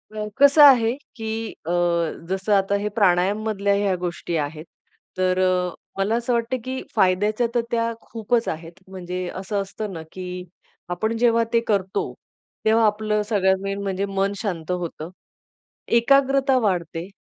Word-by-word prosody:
अ, 210 0 -3
कसं 285 +2 +6
आहे 240 -5 +7 0.2
की 225 -1 -4 0.2
अ, 170 - -2 0.6
जसं 190 +2 0
आता 195 0 +2
हे 210 - -1
प्राणायाम 200 0 +2
मधल्या 200 -2 +1
ह्या 200 -2 +1
गोष्टी 175 -1 -4
आहेत, 155 +1 -4 0.5
तर 185 0 +1 0.6
मला 200 +3 +1
असं 240 +1 -1
वाटतं 235 +2 0
की 260 +1 -4
फायद्याच्या 210 +4 +2
तर 240 - +3
त्या 230 -1 +1
खूपच 230 +1 -1
आहेत 165 +3 -7
म्हणजे 180 -1 -5
असं 200 +2 -2
असतं 200 +1 -6
ना, 165 - -6
की 180 -1 -6 0.5
आपण 220 +6 -1
जेव्हा 230 0 +3
ते 230 - +5
करतो, 195 -3 -1 0.5
तेव्हा 220 +1 +4
आपलं 210 0 +1
सगळ्यात 190 -3 +3
मेन 195 0 -3
म्हणजे 195 0 -1
मन 195 0 -1
शांत 180 -6 -3
होतं. 170 -3 -4 0.8
एकाग्रता 270 +2 +3
वाढते 175 -5 -1
200 Hz, 145 wpm, -23 LUFS, 185-230 Hz, 0.8 s, आहे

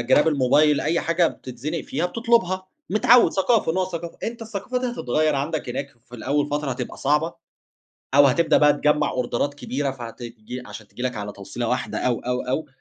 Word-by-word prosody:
جِراب 130 +6 +4
الموبايل، 150 +1 +3
أي 165 +3 +1
حاجة 170 +1 +2
بتتزنِق 140 +6 -5
فيها 175 - -1
بتطلُبها، 190 -3 +1 0.2
متعوّد، 230 +4 +5
ثقافة، 195 -3 +2
نوع 185 +2 +1
ثقافة، 170 -2 -6
أنت 230 0 -4
الثقافة 225 +3 -3
دي 255 - -2
هتتغيّر 155 - 0
عَندك 145 +3 -2
هناك، 140 - -4 0.2
في 125 - -12
الأول 140 +4 0
فترة 145 -1 -2
هتبقى 125 -1 -5
صعبة 150 +4 +1 0.8
أو 145 0 +8
هتبدأ 160 +5 +3
بقى 150 -1 +6
تجمَّع 150 +1 +2
أوردرات 125 +3 -1
كبيرة 140 0 -2
فهت 120 -4 -8 0.5
عشان 110 -2 -10
تيجي 125 - -9
لك 125 -1 -1
على 105 0 -5
توصيلة 100 +4 -5
واحدة 125 - -1
أو، 125 -2 0
أو، 125 0 -2
أو، 135 +5 -2
150 Hz, 180 wpm, -23 LUFS, 125-170 Hz, 0.8 s, أو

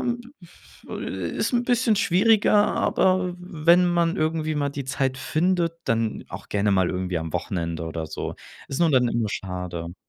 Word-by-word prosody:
m 240 0 -1 0.2
pff - - -20
äh, 95 -3 -4
ist 230 - 0
'n 240 0 +2
bisschen 245 -2 +2
schwieriger, 205 +3 +3 0.2
aber 185 -1 +1
wenn 175 0 +3
man 170 -1 +1
irgendwie 155 0 0
mal 145 -1 0
die 140 -1 -5
Zeit 130 0 -1
findet, 170 +5 0
dann 115 -1 -1
auch - - -9
gerne 100 0 +1
mal 95 -2 +2
irgendwie 90 -1 -2
am 80 -1 -6
Wochenende 85 -2 -3
oder 80 0 -4
so. - - -5 0.3
Ist 135 - -3
nur 165 -2 +4
dann 125 -3 +3
immer 115 -3 0
schade. 90 -3 -5
140 Hz, 175 wpm, -24 LUFS, -, 0.3 s, nur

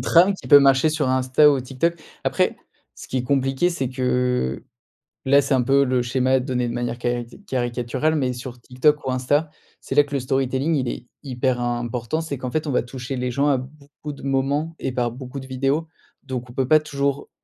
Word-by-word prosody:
trame 180 +4 +5
qui 190 - -10
peut 145 -2 +10
marcher 135 +1 +4
sur 155 -2 0
Insta 130 +3 +4
ou 140 -2 +1
TikTok. 135 +7 -1 0.3
Après, - - +1 0.4
ce - - -11
qui 130 - -1
est 125 - -1
compliqué, 135 +4 +1
c'est 135 -8 -2
que, 125 - 0 0.6
là, 140 +1 +6
c'est 140 - 0
un 130 - +3
peu 135 +3 +3
le 130 -1 +1
schéma 130 +2 +1
donné 125 -2 -1
de 120 - -3
manière 120 -1 -3
cari 120 -1 -2 0.2
caricaturale, 125 +4 -1
mais 130 -4 0
sur 125 0 -8
TikTok 130 +5 +1
ou 130 - 0
Insta, 145 +5 0 0.3
c'est - - -5
là 145 +1 +6
que 145 0 -6
le - - +1
storytelling, 135 +4 0
il 130 -3 -1
est - - -5 0.2
hyper 130 -2 -1
important, 120 +4 -2
c'est 145 -4 -4
qu'en 130 -1 -4
fait, 155 +4 -2
on 145 - -2
va - - +2
toucher 130 +2 -6
les 125 0 -1
gens 140 +4 +1
à 135 - +3
beaucoup 145 +3 -9
de 140 - -13
moments 140 +4 0
et - - -2
par 120 -2 -1
beaucoup 130 +2 -8
de 130 - -9
vidéos, 135 +5 -1 0.4
donc 125 -2 -5
on - - -11
peut 130 0 -1
pas 155 +3 +6
toujours, 140 -2 -2
130 Hz, 215 wpm, -22 LUFS, 125-145 Hz, 0.6 s, peut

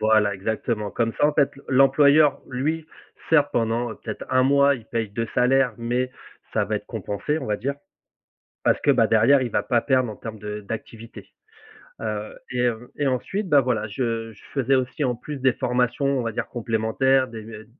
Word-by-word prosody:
Voilà, 110 -2 +3
exactement. 105 +1 -2
Comme 115 +1 -1
ça, - - +5
en 150 - +1
fait, 145 -1 +3 0.2
l'employeur 140 +2 +5
lui, 155 +5 -2 0.4
certes 145 -3 +4
pendant, 115 +1 0
heu, - - -12
peut-être 110 -2 -6
un 130 - +4
mois, 140 +1 +4
il 115 - -9
paye 115 -2 -2
2 115 +3 -3
salaires 125 0 +3
mais 120 +2 -1 0.4
ça - - +1
va - - -1
être - - -8
compensé 145 +10 -3
on - - -6
va 105 -1 0
dire. 140 +6 -3 0.9
Parce - - +2
que, - - +3
bah, - - +4
derrière 120 +5 +4
il 125 - -2
va 105 - +1
pas 115 +3 +1
perdre 130 -3 +1
en 105 - -8
termes 110 -1 -8
de 105 0 -6
d'activité. 115 +2 -8 0.7
Heu 105 -1 -4 0.2
et 125 -1 -1
heu 120 +1 -4
et 145 - +1
ensuite, 180 - -2
bah 145 -1 +6
voilà, 120 -4 -1
je 115 0 -3
je 105 - -19
faisais 135 -1 +2
aussi 130 +3 -1
en 125 -3 0
plus 145 +5 -7
des 130 -1 +3
formations, 125 +3 0
on 135 -2 +1
va 115 -1 -2
dire - - -3
«complémentaires», 120 +3 +1
des 110 -3 -9
d 110 -1 -10
120 Hz, 200 wpm, -24 LUFS, 110-135 Hz, 0.9 s, bah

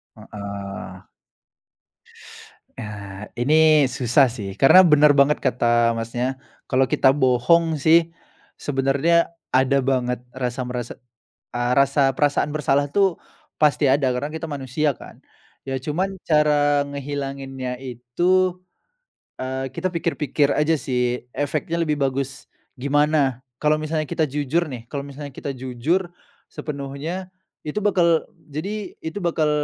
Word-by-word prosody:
Heeh. 100 -1 -8 1.7
Eee, 100 -2 -7 0.2
ini 155 +2 +5
susah 130 +2 +3
sih 110 -5 -6
karena 185 +7 +8
bener 150 0 +7
banget 140 +2 +4
kata, 120 -1 +2
Masnya. 120 +3 -2 0.3
Kalau 130 0 +3
kita 135 0 +4
bohong 145 +5 +3
sih 165 +3 +4 0.5
sebenarnya 140 +5 +1 0.2
ada 130 +1 +3
banget 125 -2 0 0.2
rasa 125 0 -3
merasa, 125 -1 -4 0.6
eee, 120 0 0
rasa 140 -1 +3
perasaan 145 0 +1
bersalah 145 -1 +1
tuh 195 +2 +1 0.4
pasti 150 -1 +3
ada 140 -1 +2
karena 145 +4 -3
kita 160 0 -5
manusia 140 0 -1
kan. - - -13 0.5
Ya 135 - -1
cuman 170 +9 -2
cara 150 -2 +3
ngehilanginnya 135 -2 -5
itu, 135 +10 0 0.9
eee, 130 0 -4
kita 185 - -2
pikir-pikir 155 -4 0
aja 155 +2 +2
sih 125 -2 -1
efeknya 155 +4 -2
lebih 150 -2 0
bagus 135 -1 -2 0.3
gimana. 140 -1 +1 0.2
Kalau 155 +2 +1
misalnya 155 0 -2
kita 155 +1 -1
jujur 150 +4 -1
nih, 120 -4 -8
kalau 140 +4 -5
misalnya 140 0 -9
kita 140 - -6
jujur 150 +9 -1 0.3
sepenuhnya 150 +6 -6 0.3
itu 155 +7 -3
bakal 175 -5 +2 0.2
jadi, 200 +7 -4
itu 160 +4 -5
bakal 165 -5 0
140 Hz, 120 wpm, -22 LUFS, 130-155 Hz, 1.7 s, karena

